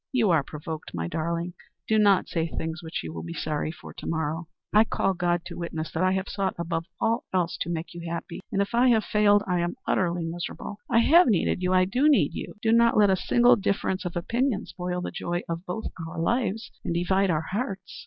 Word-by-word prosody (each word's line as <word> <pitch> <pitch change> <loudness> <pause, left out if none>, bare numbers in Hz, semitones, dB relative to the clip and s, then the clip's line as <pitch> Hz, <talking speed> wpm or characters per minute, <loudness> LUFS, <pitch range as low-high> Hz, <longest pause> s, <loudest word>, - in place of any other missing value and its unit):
"You 235 -8 +3
are 160 -3 +4
provoked, 155 - -7
my 85 -1 -2
darling. 170 - -2 0.3
Do 220 0 +3
not 200 -3 +4
say 165 -1 -1
things 160 +1 -4
which 160 - -5
you 80 -1 -6
will 80 - -5
be 85 +1 -7
sorry 155 0 -2
for 165 - -11
to - - -8
morrow. 160 +1 -2 0.3
I 210 +1 +7
call 195 -3 0
God 175 -1 0
to 175 - -7
witness 165 -2 -4
that 160 - -2
I 185 0 +3
have 190 +1 -1
sought 195 -2 -2
above 165 -1 -2
all 230 +2 +1
else 180 -2 0
to - - -1
make 165 -1 -4
you 170 - -7
happy, 170 0 -5
and 200 - +2
if 200 - -9
I 245 +2 +4
have 225 -3 +4
failed, 205 -1 +4
I 180 -2 0
am 175 0 -1
utterly 175 -2 +1
miserable. 175 +4 -5
I 230 -1 +5
have 335 +7 +6
needed 190 -4 +2
you, 180 0 +1
I 185 0 +5
do 255 +11 +3
need 290 - +3
you. - - -6
Do 225 - +3
not 235 0 +5
let 205 -2 +6
a - - +4
single 240 +6 +4
difference 195 -2 -1
of 175 - -5
opinion 230 +5 0
spoil 180 0 -4
the - - -4
joy 175 -1 -3
of 170 +2 -5
both 200 +5 -4 0.2
our - - -6
lives 225 +3 0
and 170 - -2
divide 190 +3 +2
our 160 -1 0
hearts." 200 -3 -4
180 Hz, 230 wpm, -26 LUFS, 170-210 Hz, 0.3 s, I